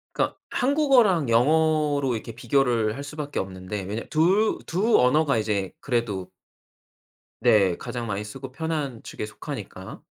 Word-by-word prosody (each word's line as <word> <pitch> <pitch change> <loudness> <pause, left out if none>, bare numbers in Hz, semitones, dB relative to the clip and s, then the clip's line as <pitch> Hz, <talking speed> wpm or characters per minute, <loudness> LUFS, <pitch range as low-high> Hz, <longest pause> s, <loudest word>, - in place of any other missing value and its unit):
그러니까 - - 0
한국어랑 250 - +3
영어로 150 +2 +3
이렇게 115 0 -5
비교를 120 -3 +1
할 140 - -6
수밖에 145 0 -5
없는데. 95 +1 -5
왜냐 105 +5 -4
2 190 +8 +3
2 205 +7 +2
언어가 140 +1 +3
이제 105 -3 -1
그래도 110 -8 -2 1.1
네. 105 -7 +4
가장 120 -1 -5
많이 105 -1 -3
쓰고 130 +5 -8
편한 150 -5 -3
축에 - - -6
속하니까. 105 -5 -8
125 Hz, 290 characters per minute, -25 LUFS, 105-155 Hz, 1.1 s, 네